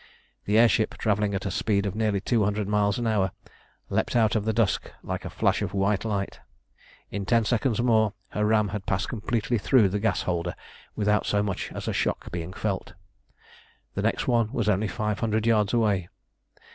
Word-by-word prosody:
The 105 +2 +2
air 120 +1 +7
ship, 110 -1 0
travelling 105 -1 0
at 95 - -3
a 100 - -1
speed 100 +1 0
of 100 - -2
nearly 105 -2 0
two 110 +2 +1
hundred 105 0 -1
miles 105 -1 +1
an 120 - -2
hour, 105 -4 +2 0.6
leapt - - -1
out 110 -2 +3
of 110 -1 0
the 110 - +2
dusk 110 -2 0
like - - -4
a - - -4
flash - - +1
of - - -3
white 100 +1 +1
light. 100 -3 -3 0.7
In 100 0 -3
ten 115 +3 +2
seconds 120 +1 +1
more 110 -3 +3 0.2
her 105 - -2
ram 105 -1 +3
had 100 0 -5
passed 95 - 0
completely 115 0 -1
through 110 -2 +4
the 105 +2 -1
gas 100 -4 0
holder 85 -1 -2 0.4
without 105 0 +1
so 100 0 +2
much 100 -3 -3
as - - -6
a - - 0
shock - - -1
being 85 0 -4
felt. 95 -2 -3 1.0
The - - -2
next - - 0
one 115 -3 +2
was 110 - -1
only 105 +1 +2
five 105 +2 -2
hundred 110 -1 0
yards 105 -3 +3
away. 105 -7 +1
105 Hz, 195 wpm, -26 LUFS, 100-110 Hz, 1.0 s, air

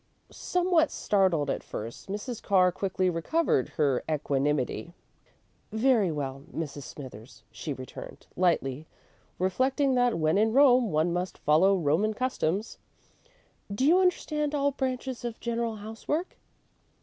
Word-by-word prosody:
'" - - -42
Somewhat 355 -3 +1
startled 185 -8 +1
at - - -3
first, 115 - -8
Mrs. 210 +4 -5
Carr 185 -3 +4
quickly 185 0 -1
recovered 175 - +1
her 140 -5 +2
equanimity. 145 +2 -1 0.8
"Very 220 -4 +3
well, 135 -2 -4
Mrs. 145 -3 -5
Smithers," 130 -3 -11
she 155 - -6
returned, 130 -2 -9
lightly, 155 -5 0 0.5
reflecting 260 +9 +1
that 245 -5 +2
when 155 +4 +2
in 220 +1 +2
Rome 255 -5 +5
one 160 +3 +1
must 180 +1 -3
follow 175 +7 +4
Roman 180 +7 +1
customs; 220 -5 -2 0.9
"Do 210 +7 0
you 340 +5 +6
understand 300 -5 0
all 285 0 +2
branches 260 -2 -3
of 235 -2 -5
general 235 -1 -2
housework?" 225 - -4
195 Hz, 125 wpm, -28 LUFS, 155-255 Hz, 0.9 s, you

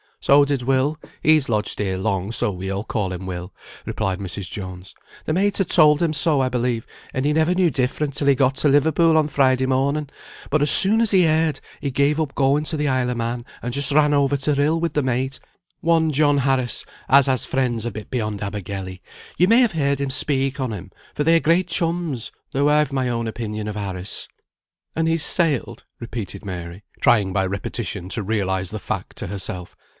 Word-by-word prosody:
"So 140 +1 +5
did 140 -2 -1
Will 135 +4 +1 0.2
(he's 155 -4 +4
lodged 105 -2 -1
here 95 -2 -1
long, 95 0 -1
so 110 - 0
we 95 0 -5
all 100 +1 -3
call 105 -4 -2
him 90 +1 -6
'Will')," 90 0 -6 0.3
replied 95 -1 -2
Mrs. 95 -1 -5
Jones. 95 -2 -8 0.3
"The 155 - -1
mate 200 +4 +1
had 195 - 0
told 150 -3 +5
him 165 -2 +1
so, 150 -2 +2
I 130 - +1
believe, 120 -2 -1 0.3
and 130 +1 -1
he 150 - +2
never 160 +3 +2
knew 180 -3 +3
different 135 +2 -1
till 140 - 0
he 140 - +5
got 135 0 +2
to 150 - +2
Liverpool 160 +3 +4
on 155 -1 +3
Friday 130 -2 +2
morning; 140 +3 0 0.4
but 155 0 +2
as 145 - +3
soon 215 +4 +4
as 230 - +2
he 185 -3 +4
heard, 160 -1 +1 0.2
he 140 - -2
gave 140 +3 +1
up 150 -4 -2
going 140 +2 +2
to 155 - -3
the 150 0 0
Isle 130 -2 +1
o' - - -2
Man, 120 +1 -3 0.2
and 120 0 -3
just 140 +1 -1
ran 150 0 +4
over 140 0 +2
to 140 +2 0
Rhyl 145 +4 +2
with 165 -2 -1
the 150 - +1
mate, 130 +1 -1 0.4
one 165 -1 +2
John 145 0 +3
Harris, 130 -2 0 0.2
as 140 0 +7
has 130 -3 0
friends 120 -4 -1
a 120 - -2
bit 105 +1 -9
beyond 105 -5 -2
Abergele; 100 -2 -5 0.4
you 180 - +5
may 230 +4 +6
have 240 -6 +2
heard 140 -3 0
him 140 -1 -1
speak 135 0 0
on 130 -3 -2
him, 95 -3 -7 0.2
for 150 - 0
they 165 +2 +4
are - - +5
great 170 +3 +2
chums, 165 -7 -1 0.2
though 140 +2 +2
I've 150 -1 +2
my 130 -2 0
own 115 -1 -2
opinion 110 -2 -4
of 105 - -4
Harris." 95 -2 -5 0.7
"And 160 0 +1
he's 165 -1 +3
sailed?" 145 -9 0
repeated 115 -4 -6
Mary, 90 0 -7 0.2
trying 100 -5 +3
by 95 -1 +1
repetition 95 -2 -4
to 110 +1 -3
realise 95 -3 -1
the 110 - -3
fact - - -5
to - - -5
herself. 90 -2 -6
135 Hz, 210 wpm, -22 LUFS, 105-150 Hz, 0.7 s, as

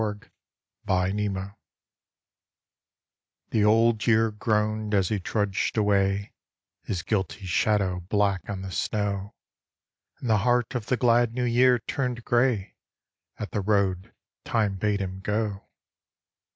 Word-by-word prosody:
BLOOD 105 -1 -5 0.6
ROAD 95 +1 -1 2.0
THE 110 - +2
Old 110 +1 +3
Year 115 -1 +4
groaned 105 -1 0
as 95 -2 +2
he 105 - 0
trudged 100 +2 -1
away, 100 -1 +1 0.5
His 90 -5 -4
guilty 100 -1 -2
shadow 95 0 +1
black 100 -2 +1
on 95 -2 -4
the 95 - -6
snow, 100 +1 -2 0.8
And 125 - -5
the 110 -2 +4
heart 120 +2 +1
of 120 -4 -4
the 125 - +1
glad 120 -1 +3
New 125 - -1
Year 125 +1 +4
turned 120 0 -3
grey 120 -5 +1 0.6
At 105 - -6
the 105 - -1
road 95 -2 0 0.3
Time 105 -4 0
bade 100 +1 0
him 95 0 -4
go. 105 0 -2
105 Hz, 125 wpm, -26 LUFS, 100-115 Hz, 2.0 s, Year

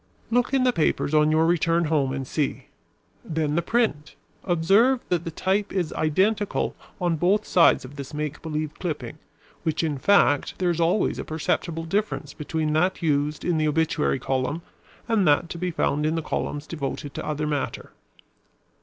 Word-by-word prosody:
"Look 245 +1 +2
in 270 -2 +2
the 250 -1 +3
papers 155 -3 0
on 150 0 +4
your 160 +1 +3
return 170 0 +2
home 150 -4 +1
and 135 0 -3
see. 145 +2 -2 0.5
Then 155 -2 -1
the 170 - +2
print. 170 -8 0 0.3
Observe 200 +9 +3
that 175 -2 0
the - - -2
type 195 +5 -1
is 180 -5 -1
identical 195 +7 0 0.2
on 175 -3 0
both 195 +7 +2
sides 170 -6 +4
of 140 +3 -11
this 140 -2 -7
make 150 -1 -4
believe 155 -1 -3
clipping, 150 -5 -4 0.4
while 160 -2 -1
in 150 -4 -1
fact 145 -5 +3
there 180 -2 +1
is 170 0 -1
always 170 +5 +1
a - - -3
perceptible 165 +1 -2
difference 195 -5 -2
between 155 0 -2
that 180 +3 +1
used 150 -1 0
in 170 -3 +1
the 155 - +2
obituary 150 - +1
column 135 +5 -2 0.4
and 220 -6 +2
that 150 +3 +3
to 170 - -6
be 180 +1 -1
found 150 -3 0
in 160 - 0
the 165 - -2
columns 145 0 -3
devoted 145 -2 -5
to - - -5
other 150 0 -2
matter. 145 -3 -3
160 Hz, 175 wpm, -25 LUFS, 150-180 Hz, 0.5 s, on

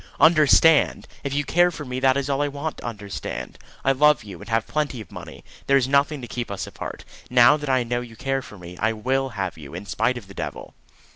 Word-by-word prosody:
"Understand! 155 0 +5 0.2
If 140 - -3
you 145 +1 0
care 175 +5 +3
for 155 -4 -7
me, 125 0 -4
that 130 0 +3
is 140 -1 -1
all 140 0 0
I 145 - +1
want 145 +2 -4
to - - -10
understand. 100 - -6 0.3
I 135 - +5
love 150 +2 +4
you, 100 -5 -10
and - - -11
have 115 0 +1
plenty 150 -5 -2
of 110 - -10
money. - - -10 0.2
There 140 - +5
is 130 -2 +1
nothing 140 +1 +2
to 120 - -7
keep 120 0 -4
us 100 -1 -4
apart. - - -8 0.2
Now 125 +2 +6
that 150 -2 -5
I 130 -2 +3
know 120 +1 -2
you 120 -2 -10
care 135 +2 -1
for 105 - -12
me, 90 0 -10
I 110 +1 +1
will 130 +5 -1
have 95 -4 -3
you, 75 +1 -10
in 95 +3 -7
spite 125 +5 0
of 110 -6 -10
the 100 - -12
devil." - - -6
130 Hz, 240 wpm, -23 LUFS, 110-140 Hz, 0.3 s, Now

